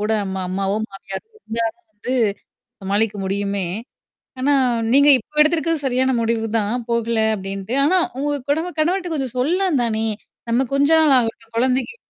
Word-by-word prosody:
கூட 210 Hz, +1 st, -1 dB
நம்ம 190 Hz, -1 st, -4 dB
அம்மாவோ, 195 Hz, +2 st, -1 dB
மாமியாரோ 195 Hz, -, -8 dB
இருந்தா 230 Hz, -, -2 dB, 0.3 s
வந்து, 220 Hz, +5 st, -5 dB, 0.7 s
சமாளிக்க 205 Hz, +2 st, 0 dB
முடியுமே. 200 Hz, 0 st, -1 dB, 0.7 s
ஆனா 280 Hz, +3 st, +2 dB, 0.4 s
நீங்க 285 Hz, +1 st, +6 dB
இப்போ 300 Hz, +6 st, -5 dB
எடுத்திருக்கிறது 325 Hz, -1 st, +1 dB
சரியான 260 Hz, 0 st, +2 dB
முடிவு 225 Hz, 0 st, 0 dB
தான். 210 Hz, +1 st, 0 dB, 0.2 s
போகல 235 Hz, -1 st, 0 dB, 0.2 s
அப்டின்ட்டு. 195 Hz, +2 st, -5 dB
ஆனா 360 Hz, +6 st, +4 dB, 0.2 s
உங்க 290 Hz, +1 st, -1 dB, 0.2 s
குடவ 320 Hz, +4 st, +1 dB
கணவர்ட்ட 350 Hz, +2 st, 0 dB
கொஞ்சம் 265 Hz, -5 st, -3 dB
சொல்லலாந்தானே! 260 Hz, -, +1 dB, 0.4 s
நம்ம 245 Hz, +3 st, +2 dB
கொஞ்ச 285 Hz, +2 st, +3 dB
நாள் 305 Hz, -4 st, +5 dB
ஆகட்டும் 225 Hz, -1 st, -4 dB
கொழந்தைக்கு. 255 Hz, -, +1 dB
235 Hz, 140 wpm, -20 LUFS, 210-290 Hz, 0.7 s, நீங்க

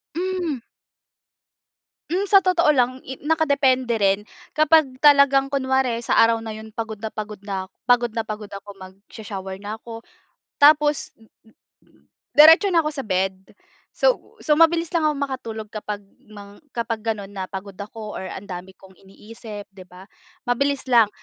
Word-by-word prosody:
Hmm. 355 Hz, -5 st, -2 dB, 1.5 s
Hmm, 390 Hz, +3 st, 0 dB
sa 390 Hz, -1 st, +6 dB
totoo 360 Hz, -3 st, +2 dB
lang, 255 Hz, 0 st, +1 dB
i 265 Hz, -, -5 dB
nakadepende 280 Hz, -6 st, +2 dB
rin. 195 Hz, -2 st, +2 dB, 0.3 s
Kapag 305 Hz, -4 st, +3 dB
talagang 280 Hz, -2 st, +5 dB
kunwari 265 Hz, -3 st, 0 dB
sa -, -, +2 dB
araw 230 Hz, 0 st, +4 dB
na 220 Hz, -, -6 dB
yun 220 Hz, 0 st, -9 dB
pagod 220 Hz, -2 st, -5 dB
na 220 Hz, -, -4 dB
pagod 215 Hz, -1 st, -7 dB
na 195 Hz, -2 st, -5 dB, 0.2 s
pagod 240 Hz, -1 st, +3 dB
na 225 Hz, 0 st, -4 dB
pagod 210 Hz, -1 st, -7 dB
ako, 200 Hz, 0 st, -9 dB
magsho-shower 195 Hz, 0 st, -9 dB
na 215 Hz, +2 st, -6 dB
ako, 230 Hz, 0 st, -10 dB, 0.6 s
tapos 295 Hz, 0 st, +4 dB
mm, 225 Hz, -, -22 dB, 0.6 s
mm, -, -, -30 dB
mm, -, -, -29 dB, 0.3 s
diretso 325 Hz, +7 st, +8 dB
na 335 Hz, -, +5 dB
ako 305 Hz, -, -2 dB
sa 275 Hz, -2 st, -6 dB
bed. 190 Hz, -1 st, 0 dB, 0.6 s
So -, -, 0 dB
so 300 Hz, -1 st, +2 dB
mabilis 330 Hz, +1 st, +4 dB
lang 320 Hz, -, +1 dB
ako 305 Hz, -1 st, +2 dB
makatulog 230 Hz, -6 st, -5 dB
kapag 210 Hz, -1 st, -5 dB, 0.3 s
mang 205 Hz, -1 st, -13 dB
kapag 230 Hz, -2 st, -3 dB
ganon 205 Hz, -3 st, -3 dB
na 190 Hz, -, -3 dB
pagod 195 Hz, 0 st, -7 dB
ako 210 Hz, +1 st, -8 dB
or 190 Hz, -, -6 dB
ang 195 Hz, +2 st, -8 dB
dami 185 Hz, +1 st, -7 dB
kong 190 Hz, 0 st, -19 dB
iniisip, 210 Hz, +1 st, -11 dB
'di 190 Hz, -1 st, -13 dB
ba. 185 Hz, +2 st, -15 dB, 0.4 s
Mabilis 275 Hz, +2 st, 0 dB
lang. 235 Hz, -4 st, +5 dB
230 Hz, 160 wpm, -22 LUFS, 205-280 Hz, 1.5 s, diretso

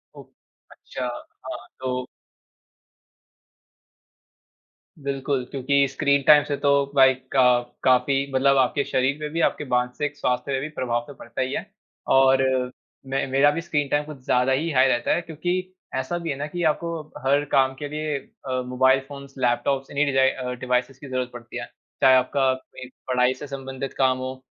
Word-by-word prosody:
ओह! -, -, -11 dB, 0.5 s
अच्छा। 130 Hz, -1 st, -7 dB
हाँ, 120 Hz, 0 st, -7 dB, 0.2 s
तो 125 Hz, -1 st, -3 dB, 3.0 s
बिल्कुल, 135 Hz, -1 st, -1 dB
क्योंकि 140 Hz, +1 st, +2 dB
स्क्रीन 140 Hz, +1 st, +1 dB
टाइम 150 Hz, -1 st, +8 dB
से 145 Hz, -, -2 dB
तो 140 Hz, -, +1 dB, 0.3 s
लाइक 130 Hz, 0 st, +3 dB
अ, 125 Hz, -2 st, +5 dB, 0.2 s
काफ़ी 135 Hz, +2 st, +2 dB
मतलब 135 Hz, +1 st, +4 dB
आपके 130 Hz, +2 st, +2 dB
शरीर 135 Hz, +2 st, +1 dB
पे 150 Hz, -, -4 dB
भी 165 Hz, +2 st, -2 dB
आपके 150 Hz, -, +1 dB
मानसिक 125 Hz, +3 st, -1 dB
स्वास्थ्य 125 Hz, +2 st, -1 dB
पे 135 Hz, -, 0 dB
भी 155 Hz, -, -4 dB
प्रभाव 120 Hz, -4 st, -2 dB
तो 145 Hz, -, -9 dB
पड़ता -, -, -6 dB
ही 130 Hz, +1 st, -1 dB
है, -, -, -3 dB, 0.4 s
और 135 Hz, 0 st, +5 dB, 0.6 s
मैं 135 Hz, +1 st, -1 dB
मेरा 140 Hz, +2 st, +5 dB
भी 165 Hz, +3 st, -3 dB
स्क्रीन 150 Hz, -4 st, -1 dB
टाइम 145 Hz, +1 st, +1 dB
कुछ 150 Hz, -2 st, -9 dB
ज़्यादा 125 Hz, +1 st, +2 dB
ही 150 Hz, +6 st, +1 dB
हाई 130 Hz, 0 st, +5 dB
रहता 120 Hz, -2 st, +1 dB
है 175 Hz, -, -1 dB
क्योंकि, 175 Hz, +3 st, -3 dB, 0.2 s
ऐसा 130 Hz, +7 st, -2 dB
भी 170 Hz, -1 st, -5 dB
है 140 Hz, -, -1 dB
ना 145 Hz, +1 st, -3 dB
कि 175 Hz, +3 st, -4 dB
आपको 170 Hz, +1 st, -4 dB, 0.3 s
हर 140 Hz, +2 st, +3 dB
काम 135 Hz, -1 st, +3 dB
के 145 Hz, +2 st, -6 dB
लिए 150 Hz, -1 st, -2 dB
अ, 130 Hz, -1 st, -5 dB
मोबाइल 130 Hz, +1 st, +3 dB
फ़ोन्स, 140 Hz, -1 st, -10 dB
लैपटॉप्स 135 Hz, +2 st, 0 dB
इन्ही 145 Hz, +1 st, +2 dB
डिजाइ 135 Hz, -1 st, +3 dB
अ, 125 Hz, -1 st, -4 dB
डिवाइसेस 125 Hz, +1 st, -1 dB
की 145 Hz, -, -10 dB
ज़रूरत 130 Hz, -1 st, -2 dB
पड़ती 120 Hz, -1 st, -8 dB
हैं। -, -, -7 dB, 0.3 s
चाहे 130 Hz, -1 st, +7 dB
आपका, 130 Hz, +1 st, +2 dB, 0.5 s
पढ़ाई 125 Hz, 0 st, +2 dB
से 145 Hz, +3 st, -9 dB
संबंधित 135 Hz, -1 st, -6 dB
काम 130 Hz, -1 st, +3 dB
हो 130 Hz, 0 st, -6 dB
135 Hz, 170 wpm, -24 LUFS, 130-145 Hz, 3.0 s, टाइम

